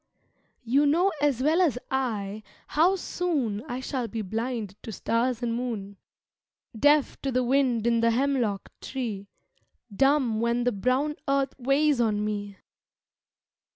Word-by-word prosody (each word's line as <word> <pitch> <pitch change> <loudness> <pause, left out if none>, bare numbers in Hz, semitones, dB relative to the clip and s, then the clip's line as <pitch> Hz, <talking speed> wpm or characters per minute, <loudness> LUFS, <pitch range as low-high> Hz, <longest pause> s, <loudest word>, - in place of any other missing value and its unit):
You 275 +5 +3
know 350 +7 +3
as 275 -4 +1
well 320 +5 +3
as 310 -9 +2
I 215 -6 -2 0.3
how 345 +6 +3
soon 295 - -2
I 250 -1 -4
shall 260 -3 -3
be 225 -1 -4
blind 225 0 -3
to 225 - -7
stars 235 +3 -1
and 235 -1 0
moon, 225 -5 -4 0.8
Deaf 290 +4 +3
to 270 - -2
the 255 0 +1
wind 250 -3 +2
in 235 -1 +3
the 230 0 +3
hemlock 240 -5 0
tree, 220 -7 -4 0.7
Dumb 270 -3 +3
when 235 +1 +1
the 245 - +2
brown 255 +8 0
earth 275 0 +1
weighs 275 +1 +2
on 210 -2 +1
me. 205 -1 -4
245 Hz, 140 wpm, -27 LUFS, 225-275 Hz, 0.8 s, You